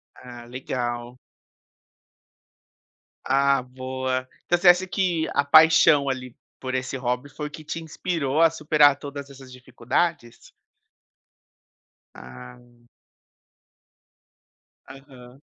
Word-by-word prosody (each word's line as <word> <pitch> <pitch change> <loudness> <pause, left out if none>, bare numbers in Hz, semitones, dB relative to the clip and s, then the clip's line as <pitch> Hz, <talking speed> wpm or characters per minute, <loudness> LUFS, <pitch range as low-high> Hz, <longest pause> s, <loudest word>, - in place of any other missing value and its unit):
Ah, 120 -1 -12
legal. 120 -1 -5 2.1
Ah, 140 +1 +2
boa. 130 0 -4 0.2
Então 175 - +2
você 175 - +1
acha 180 +1 +4
que 180 -4 -1
a 140 - +2
paixão, 155 -2 +5
ali, 125 -2 -5 0.2
por 130 -1 -4
esse 130 +1 -3
hobby 125 +2 -3
foi 150 +1 -7
que 155 +1 -11
te 165 +2 -6
inspirou 160 -3 -2
a 165 - +6
superar 150 -3 +3
todas 140 0 -8
essas 135 -1 -14
dificuldades? 125 +2 -4 1.6
Ah. 120 - -14 2.0
Aham. 130 -1 -15
135 Hz, 95 wpm, -24 LUFS, 125-150 Hz, 2.1 s, a